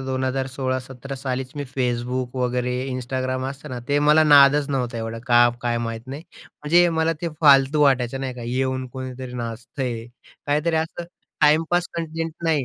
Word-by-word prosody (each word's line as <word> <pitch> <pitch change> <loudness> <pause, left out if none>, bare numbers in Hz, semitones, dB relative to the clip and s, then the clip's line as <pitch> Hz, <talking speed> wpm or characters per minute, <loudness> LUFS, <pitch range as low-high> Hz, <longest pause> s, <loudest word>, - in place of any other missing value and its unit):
तर - - -6
2016-17 130 0 -3
सालीच 130 -1 -4
मी 145 - -3
Facebook, 125 0 -1
वगैरे 125 0 0 0.2
Instagram 130 +1 -3
असतं 135 0 -10
ना, 125 - -4
ते 145 0 +2
मला 155 +1 +6
नादच 145 -1 +6
नव्हता 125 -3 -2
एवढं, 115 0 -4
का 120 -1 +6
काय 120 -1 0
माहीत 115 0 -5
नाही. 140 +4 -7 0.2
म्हणजे 175 +4 +2
मला 160 +1 +2
ते 170 - 0
फालतू 140 0 +5
वाटायचं 135 -2 +2
नाही 130 -2 -4
का, 120 - -8
येऊन 130 +1 -1
कोणीतरी 130 -1 -7
नाचतंय. 120 0 -5 0.4
काहीतरी 150 +3 +1
असं 160 +2 -3 0.4
टाईमपास 165 +4 +3
कंटेंट 165 0 -3
नाही. 155 -5 +2
130 Hz, 155 wpm, -23 LUFS, 125-145 Hz, 0.4 s, मला